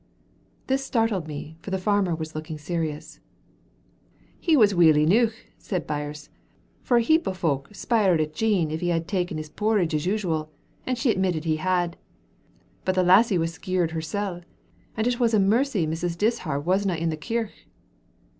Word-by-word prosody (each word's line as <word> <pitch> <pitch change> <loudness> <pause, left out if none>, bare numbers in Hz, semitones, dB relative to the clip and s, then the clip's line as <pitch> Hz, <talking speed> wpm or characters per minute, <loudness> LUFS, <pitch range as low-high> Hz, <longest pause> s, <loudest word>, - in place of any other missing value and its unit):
This 270 +1 0
startled 225 -10 0
me, 155 +1 -7
for - - -8
the 190 - 0
farmer 190 -2 +1
was 160 0 -6
looking 155 0 -6
serious. 155 -1 -4 1.2
"He 325 -3 +3
was 210 -5 +5
weel 165 -4 +5
eneuch," 215 +9 +3 0.2
said 180 -5 -3
Birse, 150 0 -5 0.5
"for 245 - +2
a 235 - +3
heap 320 +6 +3
o' - - 0
fowk 145 -7 -1
spiered 205 -5 +2
at 155 0 -1
Jean 190 -5 +1
if 160 - -3
he 175 - -1
had 165 -1 0
ta'en 180 -5 -1
his 155 -1 -7
porridge 210 -4 +1
as 155 +3 -1
usual, 170 -7 -1 0.4
and 255 -1 0
she 245 -1 +2
admitted 185 -6 0
he 155 -1 +1
had. 175 0 0 0.9
But 185 - 0
the 185 - +3
lassie 190 +3 +5
was 165 0 -1
skeered 180 -1 -1
hersel', 175 +3 -3 0.6
and 220 - 0
said - - +2
it 240 - -7
was 230 -2 +3
a - - +4
mercy 210 - +2
Mrs. 170 +2 -3
Dishart 165 -9 -1
wasna 190 0 +1
in 165 0 -1
the 160 - -1
kirk." 225 +6 -3
180 Hz, 175 wpm, -25 LUFS, 160-210 Hz, 1.2 s, was